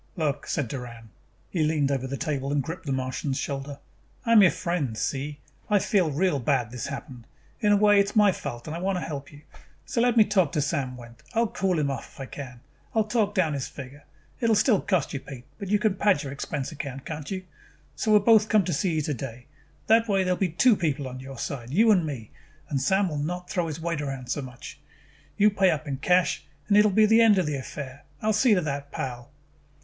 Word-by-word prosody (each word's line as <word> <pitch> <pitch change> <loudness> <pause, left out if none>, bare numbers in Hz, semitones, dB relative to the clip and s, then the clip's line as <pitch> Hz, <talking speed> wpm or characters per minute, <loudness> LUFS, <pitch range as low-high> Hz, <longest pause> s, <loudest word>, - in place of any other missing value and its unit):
"Look," 150 -5 -2
said 140 -6 -1
Doran. 115 -3 -8 0.4
He 175 - -1
leaned 150 -2 +1
over 130 -1 -1
the 135 +1 -4
table 140 -3 -2
and 145 -1 +1
gripped 160 +2 -7
the - - -1
Martian's 130 +1 -2
shoulder. 140 0 -4 0.5
"I 230 - +1
am 225 -2 +8
your 190 - +7
friend, 155 -13 -2
see? 145 +4 -2 0.3
I 210 - +4
feel 190 -3 +2
real 150 +1 +1
bad 125 -3 0
this 125 -2 -5
happened. 130 -4 -8 0.3
In 210 -3 +3
a 205 - +6
way, 205 0 +5
it 200 - +4
is 200 - -7
my 210 -2 +6
fault 120 -8 -6
and 155 - -5
I - - -4
want 190 +2 0
to 175 - -3
help 140 -3 -6
you. 145 +1 -15 0.4
So 235 - -1
let 240 -1 +2
me 220 - +9
go 210 - -10
talk 185 -8 +3
to - - 0
Sam 140 -4 -2
Wendt. 120 -1 -13
I 230 - +4
will 230 - +1
cool 190 -3 0
him 145 -2 +1
off 135 - -7
if - - -17
I 135 - -4
can. 130 -3 -9 0.3
I - - +4
will - - +4
talk 210 -2 0
down 170 -6 +2
his 140 -2 -3
figure. 140 +2 -10 0.4
It 230 - +1
will 225 - +4
still 210 -1 +3
cost 185 -7 0
you, 140 - -2
Pete, 130 -2 -10
but 200 - -5
you 210 - +4
can 210 -1 +1
pad 195 -5 +2
your 135 - -5
expense 140 +1 -4
account, 140 -3 -6
can't 150 -2 -6
you? 185 -1 -4 0.5
So 215 - -2
we 210 - +8
will 205 - -1
both 220 -2 +6
come 210 -4 +4
see 175 +1 0
you 155 - +1
today. 125 -4 -5 0.4
That 225 +1 +4
way 195 -2 +3
there 185 0 +1
will - - -5
be 190 - +1
two 220 +8 +4
people 150 -6 -1
on 130 0 -7
your 135 0 -9
side, 120 -1 -5
you 215 - +4
and 180 -6 +3
me, 120 -8 -6 0.4
and 140 -3 -1
Sam 190 +8 +2
will 150 -4 -3
not 180 +4 -4
throw 175 -2 0
his 155 0 -5
weight 165 -2 -2
around 135 -3 -5
so 145 - -1
much. 125 -2 -10 0.6
You 210 +1 +5
pay 195 -2 +3
up 155 -2 -1
in 135 -2 -2
cash 180 +5 +2 0.2
and 200 - +3
it 210 - +7
will 215 - +4
be 215 +3 +5
the 225 +2 +5
end 220 -3 +6
of 185 - +2
the 150 -1 -1
affair. 140 +1 -7 0.2
I - - -8
will 220 - +3
see 215 +1 +4
to 180 - +2
that, 140 -2 -4
pal!" 125 -2 -5
155 Hz, 250 wpm, -26 LUFS, 135-195 Hz, 0.6 s, me